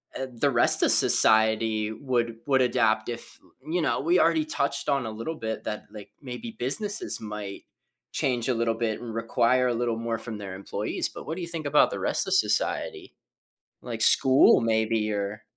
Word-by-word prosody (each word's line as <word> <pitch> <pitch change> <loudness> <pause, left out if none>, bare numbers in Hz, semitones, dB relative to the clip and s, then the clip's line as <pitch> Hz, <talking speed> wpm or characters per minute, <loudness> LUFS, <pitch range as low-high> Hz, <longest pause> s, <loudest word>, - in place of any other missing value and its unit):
eh, 135 - -4
the 130 +4 0
rest 120 -3 +3
of - - +4
society 110 0 +3
would 120 -1 -2
would 135 -2 +3
adapt 115 -3 +1
if 120 0 -8 0.3
you 175 +1 0
know, - - 0
we 170 +5 +2
already 165 -2 +2
touched 140 -2 -2
on 140 -4 0
a 110 - -5
little 115 +9 -5
bit 110 -5 -5
that, 105 - -4
like, 105 -2 -11
maybe 185 - -8
businesses 205 - -2
might 105 -2 -7 0.5
change 125 -2 -1
a 130 - +1
little 115 0 0
bit, 115 -1 -3
and 120 -2 -7
require 115 +3 +1
a 120 - 0
little 120 -1 -1
more 115 0 -3
from 115 -2 -7
their 95 -2 -7
employees, 100 - -3
but - - -10
what 160 - -3
do 185 - -6
you 170 - -5
think 165 -2 -6
about 145 +1 +4
the - - -4
rest - - -1
of - - 0
society? 390 +1 -1 0.7
Like, - - -6
school 130 -2 +6
maybe 110 -1 0
or 100 +2 -4
115 Hz, 190 wpm, -26 LUFS, 110-140 Hz, 0.7 s, school